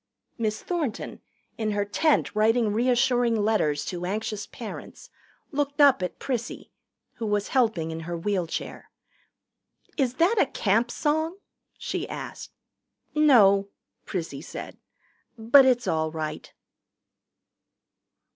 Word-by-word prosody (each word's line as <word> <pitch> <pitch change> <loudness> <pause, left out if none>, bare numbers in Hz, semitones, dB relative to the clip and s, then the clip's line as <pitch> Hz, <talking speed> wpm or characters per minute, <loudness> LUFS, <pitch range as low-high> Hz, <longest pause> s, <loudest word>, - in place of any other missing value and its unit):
Miss 215 -2 -2
Thornton, 315 -11 -3 0.4
in 215 -1 0
her 205 0 0
tent 300 +9 +1
writing 220 0 +3
reassuring 245 0 +2
letters 205 -9 +1
to 180 -1 -5
anxious 210 +2 -3
parents, 245 - -9 0.4
looked 285 0 -2
up 280 -7 +6
at 180 - -3
Prissy, 245 -4 -4 0.5
who 230 -2 -3
was 205 -1 0
helping 220 -11 +1
in 160 - -5
her 170 +1 -5
wheelchair. 180 -1 -3 1.1
"Is 260 -4 +1
that 390 - +3
a - - +3
Camp 225 -1 +1
song?" 315 +7 -1 0.4
she - - -4
asked. - - -7 0.6
"No," 210 -10 +5 0.4
Prissy 165 -7 -4
said. 160 - -8 0.6
"But 235 +5 +6
it's 245 -2 +2
all 160 -1 0
right." 155 -1 -5
220 Hz, 115 wpm, -26 LUFS, 195-265 Hz, 1.1 s, up